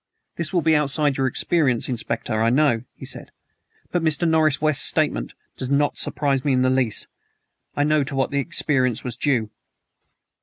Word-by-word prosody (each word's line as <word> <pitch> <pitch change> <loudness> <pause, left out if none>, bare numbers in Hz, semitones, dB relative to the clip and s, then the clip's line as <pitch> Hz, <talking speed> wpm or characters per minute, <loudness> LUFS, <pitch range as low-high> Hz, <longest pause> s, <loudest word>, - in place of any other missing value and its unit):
"This 170 -2 -1
will 175 -3 +1
be 160 -1 +4
outside 145 -1 +2
your 135 0 +1
experience, 130 -2 +1
Inspector, 120 -1 -3
I 110 +1 +2
know," 130 -3 +2
he - - -10
said, - - -5 0.6
"but 175 - 0
Mr. 160 +1 +2
Norris 155 -3 +3
West's 155 -2 +1
statement - - 0 0.2
does 130 - -4
not 145 +1 +1
surprise 140 -3 -1
me 140 - +1
in 130 0 +2
the 130 - +2
least. 130 -5 0 0.7
I 145 - +1
know 150 0 +2
to 135 - -5
what 135 -1 0
the 140 - 0
experience 135 -5 0
was 125 -2 -4
due." 120 -5 0
140 Hz, 180 wpm, -22 LUFS, 125-155 Hz, 0.7 s, be